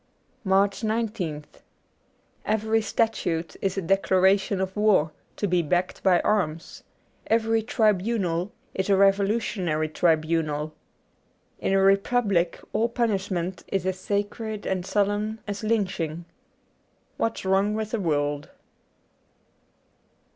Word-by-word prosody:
^ -, -, -41 dB, 0.4 s
84 205 Hz, -, -6 dB
MARCH 195 Hz, +2 st, +3 dB
19th 215 Hz, -9 st, -2 dB, 1.0 s
EVERY 220 Hz, +1 st, +1 dB
statute 175 Hz, -7 st, -1 dB
is 195 Hz, 0 st, -1 dB
a 195 Hz, -, -1 dB
declaration 195 Hz, +2 st, +2 dB
of 190 Hz, 0 st, -2 dB
war, 210 Hz, -7 st, +3 dB, 0.2 s
to 205 Hz, -, -1 dB
be 180 Hz, -1 st, +2 dB
backed 175 Hz, +3 st, -1 dB
by 185 Hz, -3 st, +4 dB
arms. 170 Hz, -7 st, -1 dB, 0.5 s
Every 225 Hz, 0 st, +2 dB
tribunal 210 Hz, -4 st, 0 dB, 0.2 s
is 190 Hz, +1 st, -2 dB
a -, -, +5 dB
revolu 195 Hz, +2 st, +4 dB
tionary 160 Hz, -9 st, -2 dB
tribunal. 155 Hz, -2 st, +1 dB, 0.9 s
In -, -, 0 dB
a 195 Hz, -, +4 dB
republic 195 Hz, -2 st, +2 dB
all 225 Hz, +3 st, +1 dB
punish 220 Hz, -5 st, 0 dB
ment 180 Hz, -1 st, -3 dB
is 195 Hz, -2 st, -2 dB
as 190 Hz, 0 st, -1 dB
sacred 205 Hz, +2 st, -3 dB
and 185 Hz, -1 st, -2 dB
solemn 205 Hz, +2 st, 0 dB
as 205 Hz, +1 st, -4 dB
lynching. 185 Hz, -7 st, -1 dB, 0.9 s
'What's 225 Hz, -3 st, -2 dB
Wrong 195 Hz, +2 st, +2 dB
with 215 Hz, 0 st, -3 dB
the 230 Hz, -, -1 dB
World.' 145 Hz, -4 st, -1 dB
195 Hz, 120 wpm, -25 LUFS, 175-215 Hz, 1.0 s, a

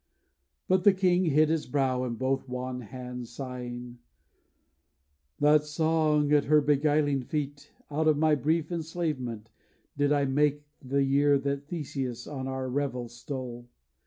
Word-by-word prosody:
But 185 Hz, -1 st, +3 dB
the 205 Hz, -, +7 dB
king 185 Hz, -1 st, +3 dB
hid 155 Hz, 0 st, +4 dB
his 160 Hz, -1 st, 0 dB
brow 130 Hz, -2 st, 0 dB
in 120 Hz, -2 st, -3 dB
both 130 Hz, +2 st, -1 dB
wan 125 Hz, 0 st, -4 dB
hands, 125 Hz, +1 st, -7 dB
Sighing: 125 Hz, -1 st, -7 dB, 1.4 s
'That 150 Hz, +1 st, +5 dB
song 150 Hz, -1 st, +1 dB
at 145 Hz, -1 st, +4 dB
her 150 Hz, +1 st, +5 dB
beguiling 145 Hz, -1 st, +2 dB
feet, 145 Hz, +1 st, -4 dB, 0.2 s
Out 155 Hz, +2 st, +1 dB
of 155 Hz, -2 st, +4 dB
my 155 Hz, 0 st, +3 dB
brief 155 Hz, +4 st, 0 dB
enslavement, 150 Hz, -10 st, -3 dB, 0.4 s
did 145 Hz, 0 st, +1 dB
I 145 Hz, -1 st, +3 dB
make 145 Hz, +2 st, +1 dB, 0.2 s
The 140 Hz, 0 st, 0 dB
year 140 Hz, +1 st, +4 dB
that 140 Hz, 0 st, -3 dB
Theseus 135 Hz, -7 st, -4 dB
on 135 Hz, -3 st, -5 dB
our 130 Hz, 0 st, -3 dB
revels 125 Hz, -3 st, -3 dB
stole. 120 Hz, -1 st, -6 dB
140 Hz, 140 wpm, -28 LUFS, 125-150 Hz, 1.4 s, the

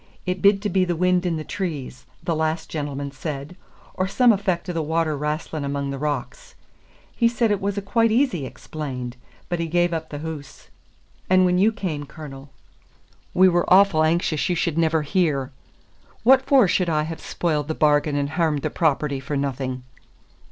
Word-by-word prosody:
It 180 Hz, 0 st, -2 dB
bid 200 Hz, 0 st, +4 dB
to 210 Hz, -, 0 dB
be 185 Hz, 0 st, +2 dB
the 175 Hz, -1 st, -1 dB
wind 180 Hz, +1 st, +2 dB
in 170 Hz, -, 0 dB
the 155 Hz, -, -4 dB
trees, 150 Hz, -9 st, -5 dB, 0.2 s
the 165 Hz, -, 0 dB
last 160 Hz, +1 st, -2 dB
gentleman 145 Hz, -2 st, -4 dB
said, 140 Hz, +3 st, -6 dB, 0.4 s
or 185 Hz, -, -1 dB
some 245 Hz, +5 st, +4 dB
effec' 190 Hz, -4 st, -1 dB
o' 180 Hz, -, -3 dB
the 165 Hz, -, -1 dB
water 160 Hz, 0 st, 0 dB
wrastlin' 150 Hz, +1 st, -3 dB
among 140 Hz, 0 st, -2 dB
the 135 Hz, -, -5 dB
rocks. 150 Hz, -, -4 dB, 0.6 s
He 235 Hz, -, +3 dB
said 235 Hz, -1 st, +1 dB
it 205 Hz, -, 0 dB
was 200 Hz, +1 st, -2 dB
a' 200 Hz, -, -2 dB
quite 230 Hz, +3 st, +2 dB
easy 220 Hz, -, +1 dB
explained; 130 Hz, -5 st, -6 dB, 0.3 s
but 175 Hz, -1 st, -2 dB
he 165 Hz, -, -1 dB
gave 175 Hz, +1 st, +1 dB
up 160 Hz, -, -3 dB
the 145 Hz, -, -6 dB
hoose. 145 Hz, -2 st, -8 dB, 0.6 s
And 185 Hz, 0 st, +5 dB
when 180 Hz, 0 st, +2 dB
you 210 Hz, +4 st, +4 dB
cam, 170 Hz, -10 st, -4 dB
Cornel, 140 Hz, -3 st, -10 dB, 0.9 s
we 185 Hz, +1 st, +7 dB
were 175 Hz, -1 st, +2 dB
awfu' 185 Hz, -4 st, +6 dB
anxious 160 Hz, -1 st, +1 dB
you 180 Hz, -, +1 dB
should 170 Hz, -1 st, -1 dB
never 160 Hz, -1 st, +2 dB
hear. 145 Hz, -5 st, 0 dB, 0.7 s
What 260 Hz, +3 st, +6 dB
for 265 Hz, -7 st, +6 dB
should 180 Hz, 0 st, +1 dB
I 155 Hz, -2 st, +1 dB
have 160 Hz, +1 st, -6 dB
spoiled 150 Hz, -4 st, -1 dB
the 160 Hz, -, -2 dB
bargain 150 Hz, -1 st, +2 dB
and 140 Hz, 0 st, 0 dB
hairmed 160 Hz, -3 st, 0 dB
the -, -, -1 dB
property 150 Hz, -4 st, 0 dB
for 140 Hz, +2 st, -3 dB
no 140 Hz, 0 st, 0 dB
thing?" 130 Hz, -1 st, -5 dB
160 Hz, 190 wpm, -23 LUFS, 145-185 Hz, 0.9 s, we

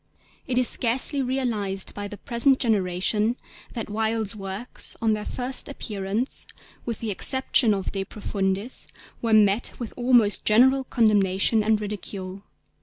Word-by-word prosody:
It 250 Hz, -, -1 dB
is 250 Hz, -1 st, +4 dB
scarcely 260 Hz, +6 st, +2 dB
realised 230 Hz, -7 st, -1 dB
by 205 Hz, 0 st, -5 dB
the 205 Hz, -, -9 dB
present 255 Hz, +5 st, +3 dB
generation 210 Hz, 0 st, +1 dB, 0.4 s
that 230 Hz, -3 st, -4 dB
Wilde's 220 Hz, 0 st, -1 dB
works 195 Hz, +4 st, -5 dB
on 225 Hz, -1 st, +2 dB
their 210 Hz, 0 st, -4 dB
first 255 Hz, +2 st, -2 dB
appearance, 210 Hz, -2 st, -2 dB, 0.4 s
with 230 Hz, -, -4 dB
the 225 Hz, -2 st, -2 dB
exception 255 Hz, +2 st, +2 dB
of 195 Hz, -2 st, -2 dB
De 195 Hz, -1 st, -2 dB
Profundis, 195 Hz, +2 st, -2 dB, 0.3 s
were 230 Hz, -, -1 dB
met 215 Hz, +1 st, +3 dB
with 235 Hz, -3 st, -6 dB
almost 240 Hz, -4 st, +3 dB
general 265 Hz, +5 st, +4 dB
condemnation 215 Hz, -2 st, +2 dB
and 215 Hz, 0 st, +2 dB
ridicule. 200 Hz, -2 st, -6 dB
215 Hz, 135 wpm, -24 LUFS, 200-245 Hz, 0.4 s, is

